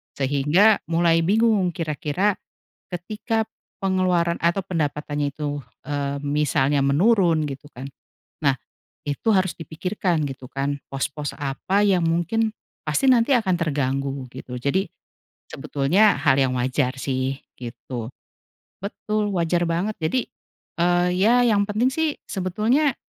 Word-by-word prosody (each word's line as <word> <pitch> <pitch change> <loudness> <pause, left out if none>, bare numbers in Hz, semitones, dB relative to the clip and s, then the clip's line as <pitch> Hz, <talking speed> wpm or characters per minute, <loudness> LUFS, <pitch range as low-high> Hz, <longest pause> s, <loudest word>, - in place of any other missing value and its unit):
Sehingga 145 +10 +3
mulai 165 0 +4
bingung 210 0 +3
kira-kira 160 +5 0 0.6
ketika 215 +5 -2 0.3
pengeluaran 180 -3 +2
atau 170 +3 +2
pendapatannya 150 -4 -2
itu, 145 -1 -3 0.3
eee, 140 -1 -2
misalnya 145 -1 +1
menurun 170 +1 +3
gitu 140 +2 -8
kan. 130 +3 -7 0.5
Nah, 140 -3 +2 0.5
itu 145 +10 -1
harus 185 -5 +2
dipikirkan 170 0 -2
gitu 130 -2 -9
kan, 140 +1 -2
pos-pos 140 +2 -3
apa 165 +9 0
yang 185 -4 +3
mungkin 175 +7 +1 0.3
pasti 155 - +1
nanti 250 +1 +4
akan 190 -6 +1
terganggu 140 -4 -1
gitu. 125 -1 -7
Jadi, 185 +10 0 0.6
sebetulnya 175 +10 +2
hal 135 -2 +4
yang 130 -1 +1
wajar 130 +1 0
sih 135 0 -2 0.2
gitu. 120 0 -7 0.7
Betul, 210 +1 -2
wajar 175 0 +1
banget. 180 +6 -1
Jadi, 225 +11 0 0.5
eee, 175 0 +3
ya 240 +4 +5
yang 205 -3 +3
penting 220 +5 +2
sih 320 -1 0
sebetulnya 220 - +1
165 Hz, 120 wpm, -23 LUFS, 140-200 Hz, 0.7 s, ya